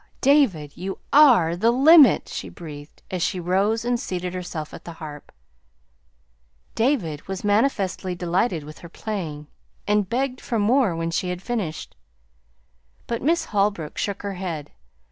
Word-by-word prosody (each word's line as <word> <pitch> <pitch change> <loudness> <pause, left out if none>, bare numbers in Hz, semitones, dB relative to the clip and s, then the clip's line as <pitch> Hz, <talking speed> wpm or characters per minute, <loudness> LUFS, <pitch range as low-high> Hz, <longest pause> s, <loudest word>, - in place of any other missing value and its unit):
"David, 240 - +3
you 190 +2 -5 0.2
are 245 - +6
the 210 +6 +1
the - - +5
LIMIT!" 280 - +6
she 95 - -6
breathed, 145 - -11
as 185 -2 -2
she 180 - 0
rose 200 +6 0
and 245 0 0
seated 180 -3 -4
herself 175 -4 -6
at - - -10
the 170 - -8
harp. 150 -3 -10 1.4
David 220 - -1
was 190 -1 -5
manifestly 205 -4 0
delighted 175 0 0
with 150 +1 -11
her 170 - -11
playing, 165 -7 -5 0.4
and 210 -2 +1
begged 255 +1 -1
for 235 - -2
more 220 -2 +2
when 165 0 -2
she 180 +2 -1
had 180 +1 -5
finished; 200 -10 -4 1.1
but 235 - -3
Miss 325 +4 +1
Holbrook 200 - -1
shook 200 -1 -3
her 200 -1 -3
head. 175 -6 -5
190 Hz, 150 wpm, -23 LUFS, 165-235 Hz, 1.4 s, are